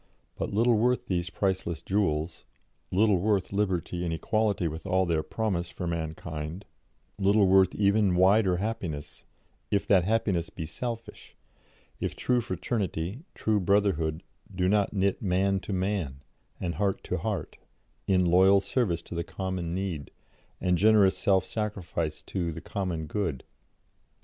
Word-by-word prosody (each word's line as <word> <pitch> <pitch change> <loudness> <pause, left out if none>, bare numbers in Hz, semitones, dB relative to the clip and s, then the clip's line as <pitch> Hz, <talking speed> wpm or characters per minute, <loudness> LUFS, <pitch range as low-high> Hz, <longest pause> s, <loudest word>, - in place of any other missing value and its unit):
But - - -3
little 115 +2 +3
worth 125 +2 +2
these 90 -1 -1
priceless 95 -5 -2
jewels, 85 -5 -1 0.5
little 100 0 +3
worth 100 0 0
liberty 90 -3 -1
and 85 - -1
equality 105 +1 0
with 80 +3 -6
all 95 0 +2
their 80 -2 +1
promise 95 -3 -2
for 90 - -6
mankind, 80 +1 -4 0.5
little 100 +1 +4
worth 95 -1 +4
even 100 -2 +3
wider 95 0 +4
happiness, 90 -8 -4 0.4
if 100 -1 +1
that 95 -4 +4
happiness 95 -4 0
be 80 - -6
selfish, 115 +8 -6 0.6
if - - -3
true 125 -1 +1
fraternity, 110 - -3
true 110 -1 +1
brotherhood, 90 -5 +1 0.3
do 90 0 +1
not 100 0 +2
knit 100 -1 0
man 95 0 +1
to 100 - -7
man, 90 -8 -2 0.4
and 85 -2 -2
heart 100 -2 0
to - - -2
heart, - - -3 0.5
in 90 -2 +3
loyal 95 +3 +6
service 95 -5 -1
to - - -9
the 85 0 -2
common 90 -3 -4
need, 90 -7 -3 0.5
and 90 -2 +1
generous 105 -2 +5
self 95 -2 +2
sacrifice 100 -7 -3
to 85 -3 -2
the 80 - -6
common 90 -3 -3
good." 80 -5 -2
95 Hz, 140 wpm, -28 LUFS, 85-105 Hz, 0.6 s, loyal